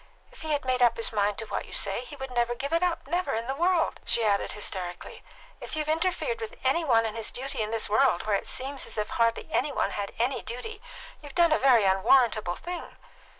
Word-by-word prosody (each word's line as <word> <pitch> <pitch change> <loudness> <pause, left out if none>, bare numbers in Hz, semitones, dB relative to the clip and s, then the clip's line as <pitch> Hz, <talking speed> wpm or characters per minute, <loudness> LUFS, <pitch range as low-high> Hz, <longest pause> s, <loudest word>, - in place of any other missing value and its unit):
If - - -14
he 315 - -4
had 290 -2 -1
made 255 -1 0
up 235 -2 +4
his 230 - 0
mind 205 -1 +1
to 225 - -4
what - - -4
you - - -11
say, 200 +5 +1
he 290 - -10
would 265 -2 -7
never 240 -1 0
give 280 +6 -4
it 335 - +3
up 355 -2 0
never 350 +2 -1
in 225 +1 -2
the 265 - -2
world!" 345 +3 +1
she 235 - +3
added 200 -1 +1
hysterically. 185 -4 -5 0.4
"If - - -6
you've 305 -1 -2
interfered 365 +9 0
between 450 -1 -7
any 340 - +2
one 230 -6 +3
and 220 - -3
his 225 -1 -3
duty 265 -2 -4
in 215 - -1
this 225 0 -2
world, 220 -3 +2
where 215 -1 +2
it - - -3
seems 270 +1 -3
as - - -2
if 210 - -1
hardly 230 0 +1
any 300 - +1
one - - 0
had 200 -1 -4
any 245 +4 0
duty, 410 - -7 0.4
you've 290 -3 -11
done 340 -2 +4
a 310 - +3
very 255 -5 +5
unwarrantable 195 0 +3
thing." 350 - -7
250 Hz, 235 wpm, -27 LUFS, 220-310 Hz, 0.4 s, very